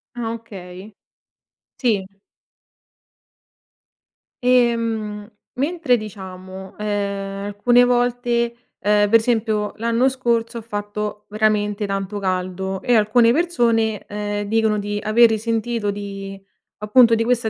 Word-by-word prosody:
Ah 230 -2 -3
okay. 200 -3 -10 0.9
Sì. 210 -6 +1 2.4
Ehm, 230 -4 +1 0.3
mentre 290 -2 +1
diciamo, 190 -3 -9
ehm, 200 -1 -3
alcune 240 +5 +3
volte, 245 -1 +1 0.2
ehm, 205 +1 +3
per 230 +2 +6
esempio 220 -2 0
l'anno 230 +3 +1
scorso, 235 -3 -1
ha - - -9
fatto 210 -1 -5
veramente 210 -1 0
tanto 195 +1 -3
caldo 185 0 -2
e 245 -2 +2
alcune 230 +2 +4
persone, 235 - +1
ehm, 205 0 -3
dicono 220 0 +1
di 205 0 -3
aver 225 +3 +6
risentito 225 -1 -1
di 195 -1 -7 0.4
appunto 230 +2 +5
di 225 0 0
questa 240 -2 +1
215 Hz, 105 wpm, -21 LUFS, 205-235 Hz, 2.4 s, per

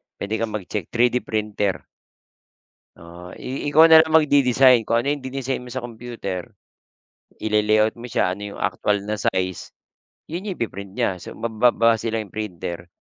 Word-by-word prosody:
puwede 105 +2 -3
kang 115 -2 -2
mag 100 - -4
check, 100 -6 -3
3D 125 +1 +3
printer. 105 -4 -2 1.1
Oo, 85 +1 -12
i 135 +3 -5
ikaw 160 +3 +6
na 160 - +10
lang 160 - +4
magde-design 135 -6 +4
kung 115 +1 +2
ano 140 - 0
yung 145 - -2
dinesign 130 0 -4
mo 125 - -11
sa 125 0 -5
computer, 115 -6 -6 0.9
ile-layout 110 0 +2
mo 120 0 -10
siya 90 -1 +1
ano 100 - -11
yung - - -10
aktuwal 105 -1 0
na 105 - -1
size, 95 -3 -2 0.6
yun 170 +4 -5
yung 185 - -5
ipi-print 100 -4 -5
niya, 95 -7 -1
so - - -10
ma - - -5
magbabase 115 0 +2
lang 110 -3 -4
printer, 85 -4 -6
115 Hz, 165 wpm, -22 LUFS, 100-125 Hz, 1.1 s, na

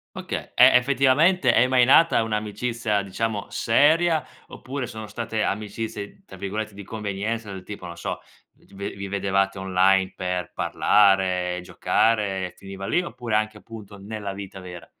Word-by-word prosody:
Okay, - - -5
e - - +7
effettivamente 135 +3 +4
è 120 - +5
mai 125 -1 +4
nata 165 +1 +5
un'amicizia 110 0 -1
diciamo 100 +1 -3
seria, 160 +7 +3 0.3
oppure 135 0 -6
sono 110 -2 -8
state 110 +1 -3
amicizie 105 - -4
tra - - -12
virgolette 105 +2 -4
"di 100 - -9
convenienza", 105 +1 -4
del 95 -1 -7
tipo 105 -3 -8
non 85 -1 -7
so, 85 - -4 0.4
vi - - -27
g 100 0 -7
vi 100 0 -5
vedevate 100 0 0
online 95 0 +2
per 90 -2 -3
parlare, 95 -3 +2
giocare, 95 -2 0
finiva 95 0 -8
lì 175 - +2
oppure 120 -10 -4
anche 110 0 0
appunto, 105 -3 -11
nella 100 0 -6
vita 95 -1 -8
vera? 90 -4 -9
105 Hz, 150 wpm, -24 LUFS, 95-115 Hz, 0.4 s, e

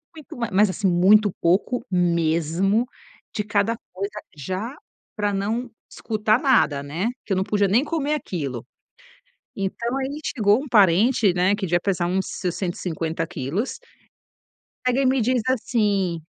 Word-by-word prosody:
muito 310 -3 -11
ma 235 -2 -2
mas 205 +2 +4
assim 185 +2 -1
muito 195 +4 +5
pouco 200 +8 +1
mesmo 170 +4 +1 0.5
de 210 - -1
cada 210 +2 0 0.2
coisa, 200 +3 -5
já 190 - -4 0.4
pra 205 -1 0
não 220 +6 -2 0.2
escutar 215 0 0
nada, 240 - +3
né? 155 +9 -3 0.2
Que 200 - -1
eu - - 0
não 190 - +1
podia 205 0 +1
nem 220 +8 +3
comer 305 -1 -1
aquilo. 140 - -4 0.9
Então 235 +6 -2
aí 270 +2 -3
chegou 215 -3 +2
um - - -8
parente, 205 +1 +4
né, 180 +3 +2
que 205 -2 -3
devia 175 0 +2
pesar 180 -2 -1
uns 190 +2 0
seus 180 -2 -3
150 165 -3 -3
quilos, 165 - -3 1.1
pega 250 +1 +2
e 270 - +2
me 260 0 +3
diz 250 +2 +2
assim: 205 -8 0
200 Hz, 150 wpm, -23 LUFS, 175-235 Hz, 1.1 s, muito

